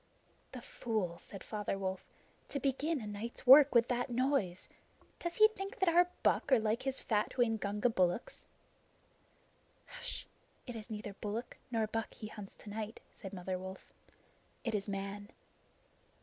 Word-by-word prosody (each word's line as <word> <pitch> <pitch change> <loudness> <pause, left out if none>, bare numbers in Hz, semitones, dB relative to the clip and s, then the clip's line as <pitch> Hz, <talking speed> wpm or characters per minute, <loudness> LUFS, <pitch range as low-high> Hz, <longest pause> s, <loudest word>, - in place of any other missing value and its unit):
"The - - -7
fool!" 215 - -2
said 195 - -9
Father 210 -2 -2
Wolf. 190 -1 -3 0.4
"To 280 - -2
begin 280 +4 0
a - - -6
night's 210 +3 -6
work 275 +1 +9
with 235 0 +6
that 245 0 0
noise! 245 -7 0 0.5
Does 345 0 -3
he 430 - +8
think 400 +2 -6
that 380 -5 +3
our 350 +1 +6
buck 285 - +2
are 260 - +8
like 220 +1 +1
his 270 0 -1
fat 210 -2 0
Waingunga 220 -2 +2
bullocks?" 185 +1 0 1.5
"H'sh. - - -4 0.4
It 245 - -6
is 220 0 -7
neither 210 -2 -5
bullock 215 +4 -5
nor 225 -2 +1
buck 225 +1 -3
he - - -8
hunts 205 -3 -9
to - - -12
night," 220 +1 -4
said 195 -4 -9
Mother 185 -1 -3
Wolf. 190 +1 -9 0.7
"It 230 - -1
is 205 -1 -1
Man." 200 +1 -4
220 Hz, 155 wpm, -34 LUFS, 200-255 Hz, 1.5 s, work